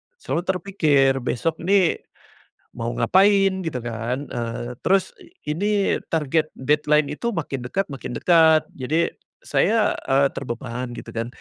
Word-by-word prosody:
selalu 175 - -3
terpikir, 155 -8 +2
"Besok 145 +6 -2
nih, 185 0 +2 0.8
mau 115 0 -3
ngapain?" 195 0 +3
Gitu 160 - -3
kan, 120 +4 -4
eee, 120 +1 -5
terus 190 0 +3 0.4
ini 200 +5 +1 0.2
target 155 0 +1
deadline 150 +1 +1
itu 235 +9 -3
makin 135 -6 -4
dekat 190 +7 -2
makin 135 -3 -6
dekat 160 -1 +5
jadi 155 +6 -1 0.3
saya, 225 - +1
eee, 135 +1 +3
terbeban, 120 +1 -5
gitu - - -9
kan. 115 0 -3
150 Hz, 125 wpm, -23 LUFS, 125-185 Hz, 0.8 s, dekat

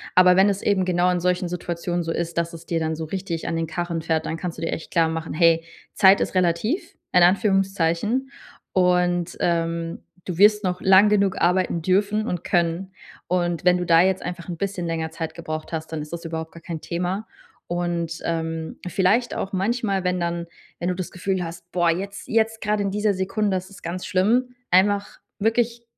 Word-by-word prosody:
aber 180 0 +7
wenn 195 +2 +5
es 200 0 -1
eben 195 -2 +2
genau 180 0 +2
in 175 -1 -1
solchen 180 0 +1
Situationen 175 0 -3
so 165 - -3
ist, 170 0 -3
dass 170 0 0
es 165 0 -10
dir 165 - -1
dann 160 0 -1
so 160 - -4
richtig 175 -1 -4
an - - -1
den 165 0 0
Karren 170 0 -3
fährt, 160 0 0
dann 160 - -2
kannst 175 -1 -5
du - - -8
dir 165 - -1
echt 160 - -7
klar 165 -2 +3
machen: 160 -1 -4
Hey, 165 0 +4 0.3
Zeit 195 -1 +6
ist - - -2
relativ, 185 - 0 0.2
in 180 -1 +6
Anführungszeichen, 195 +4 +2 0.4
und, 180 -1 +2
ähm, 165 -1 -1 0.2
du 180 -3 -4
wirst 210 +1 +5
noch 180 0 -1
lange 190 +2 +6
genug 200 -2 +2
arbeiten 180 -1 +2
dürfen 205 +5 +1
und 180 -5 -3
können. 175 +1 0 0.4
Und 175 -2 0
wenn 180 0 +5
du 180 - -2
da 165 0 +6
jetzt 190 +1 +2
einfach 175 0 -6
'n 170 - -4
bisschen 190 -1 -3
länger 160 -1 -2
Zeit 160 -1 -5
gebraucht 155 -1 -6
hast, 160 0 -4
dann 155 - -2
ist 150 +1 -8
das 170 0 -6
überhaupt 160 -1 -5
gar 165 - -13
kein 165 -2 -6
Thema. 180 +5 -3 0.4
Und, 170 -1 -2
ähm, 165 -1 -3
vielleicht 200 +7 +2
auch 195 - -3
manchmal, 200 0 0
wenn 180 0 +1
dann 170 0 -2 0.3
wenn 175 - -2
du 180 - -1
das 185 -2 -5
Gefühl 185 0 -2
hast, 170 +1 -8
„Boah, 175 -1 +3
jetzt, 195 +4 -5
jetzt 225 0 +1
gerade 210 -1 0
in 195 - -1
dieser 210 +1 +1
Sekunde, 190 +1 0
ist 185 0 -7
es 200 - -14
ganz 175 +2 -4
schlimm,” 230 +6 +1 0.2
einfach 200 +2 +2 0.2
wirklich 230 +2 +1
180 Hz, 205 wpm, -23 LUFS, 170-195 Hz, 0.4 s, aber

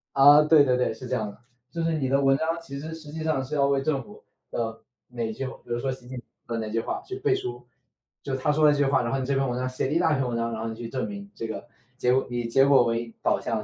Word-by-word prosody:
啊， 145 +2 +8
对 155 -1 +6
对 125 -2 +2
对， 125 - +1
是 125 +3 -9
这 130 - -1
样 110 -3 -2
的。 - - -12 0.3
就 165 - -3
是 165 0 +1
你 130 -3 -1
的 140 - +3
文 135 0 +4
章， 165 +2 -1
其 140 -4 -7
实 160 +2 -6
实 155 -2 -10
际 155 +1 -5
上 155 -4 0
是 150 +4 -5
要 140 -1 +3
为 140 -1 +2
政 135 -2 0
府 - - -15 0.3
的 115 -1 -3 0.3
哪 115 -2 -3
句， 135 +4 -4
比 130 - -4
如 120 - -2
说 135 +1 -1
习 125 -1 -9
近 130 0 -7
平 115 -1 -7
的 110 - -3
哪 - - -6
句 115 - 0
话 - - -3
去 385 - -6
背 400 -1 +2
书。 380 -1 -5 0.6
就 135 -1 -3
他 150 +3 +1
说 155 +1 +3
了 150 - +7
这 145 - +1
句 140 - +4
话， 135 -1 +3
然 115 - -2
后 - - +1
你 130 - -2
这 140 - 0
篇 135 0 +1
文 125 0 -2
章 130 0 -1
写 130 - -2
了 - - -4
一 165 - +3
大 160 -3 +3
篇 135 -3 0
文 120 - -2
章， 115 0 -1
然 110 - -4
后 115 - -3
你 110 - -4
去 115 0 -7
证 130 +1 -2
明 200 -1 -8
这 115 - -5
个 110 - -6 0.3
结 125 0 +2
果 135 - +1
以 120 -1 -2
结 135 +4 +4
果 140 -3 +6
为 115 0 -2
导 - - +2
向 - - -2
135 Hz, 340 characters per minute, -26 LUFS, 120-150 Hz, 0.6 s, 啊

